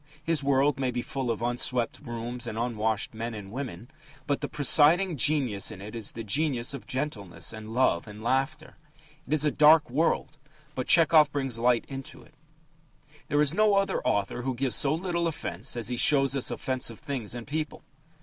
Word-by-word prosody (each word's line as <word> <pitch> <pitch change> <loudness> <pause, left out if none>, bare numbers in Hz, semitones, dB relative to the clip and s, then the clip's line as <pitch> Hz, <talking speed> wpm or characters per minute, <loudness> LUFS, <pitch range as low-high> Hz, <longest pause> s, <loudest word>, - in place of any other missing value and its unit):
His 165 -1 0
world 140 +1 +2
may 130 -2 0
be 120 -1 -3
full 135 -3 -4
of 115 0 -2
unswept 120 0 -1
rooms 120 -1 -5
and 110 - -5
unwashed 110 -2 -1
men 115 +1 -5
and 100 -2 -9
women, 120 -4 -6 0.4
but 145 - -1
the - - -2
presiding 160 +5 +4
genius 125 -6 +2
in - - -7
it 105 +3 -9
is 115 -3 -5
the 115 - -6
genius 130 +2 +1
of 140 - -8
gentleness 105 - -4
and 110 0 -9
love 115 -6 +1
and 105 +1 -10
laughter. 135 +5 -2 0.5
It - - -2
is 155 -1 +3
a 150 - +2
dark 150 -2 +5
world, 150 +1 0 0.3
but 130 -2 -4
Tchehov 155 -3 +5
brings 135 -5 -2
light 120 0 +2
into 135 -1 -8
it. - - -21 0.9
There 145 - +2
is 150 0 +2
no 210 +1 +3
other 195 0 +1
author 100 +4 -1
who 130 0 -3
gives 130 0 -1
so 140 - +3
little 170 +1 -1
offence 120 - -4
as 115 0 -1
he 125 - -2
shows 135 0 +4
us 135 - -1
offensive 125 -1 -3
things 130 -7 -5
and 120 -1 -7
people. 155 +1 -4
130 Hz, 190 wpm, -27 LUFS, 115-150 Hz, 0.9 s, dark